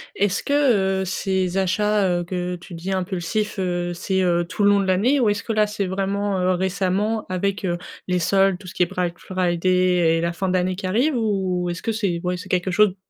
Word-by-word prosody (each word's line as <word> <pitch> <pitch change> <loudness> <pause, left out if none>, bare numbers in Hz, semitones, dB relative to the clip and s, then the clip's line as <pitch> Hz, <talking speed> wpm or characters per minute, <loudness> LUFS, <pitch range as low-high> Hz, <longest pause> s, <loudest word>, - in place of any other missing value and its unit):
Est-ce 200 -1 +1
que 215 -10 +2
heu, 190 - -2
ces 190 0 -1
achats 205 +1 +2
heu, 175 - -2
que 180 0 -3
tu 175 +1 -12
dis 175 +3 -5
impulsifs, 190 +3 -2
heu, 175 -1 -1
c'est 190 +2 -1
heu, 175 -1 +2
tout 205 - -2
le 205 - +6
long 200 0 +4
de 195 - 0
l'année? 210 +10 +2
Ou 235 -4 +3
est-ce 205 0 -1
que 225 - -2
là, 215 -1 +3
c'est 205 -2 -2
vraiment, 195 +1 -1
heu, 180 0 +2
récemment, 190 +4 0
avec 195 +2 -1
heu, 175 -1 0 0.3
les 180 -1 +1
soldes, 195 +1 +3
tout 185 0 -13
ce - - -8
qui 180 - +2
est - - +3
Black 180 -1 -3
Friday 180 -2 +1
et - - -1
la 170 0 -1
fin 190 +2 -2
de - - 0
l'année 185 0 +1
qui 190 0 -4
arrive? 250 +10 +1
Ou 190 -6 0
est-ce 175 - -4
que 225 - -1
c'est, 195 -6 -1
ouais 180 0 -1
c'est 185 +2 -9
quelque 185 +1 0
chose 205 -1 +3
190 Hz, 235 wpm, -22 LUFS, 180-200 Hz, 0.3 s, le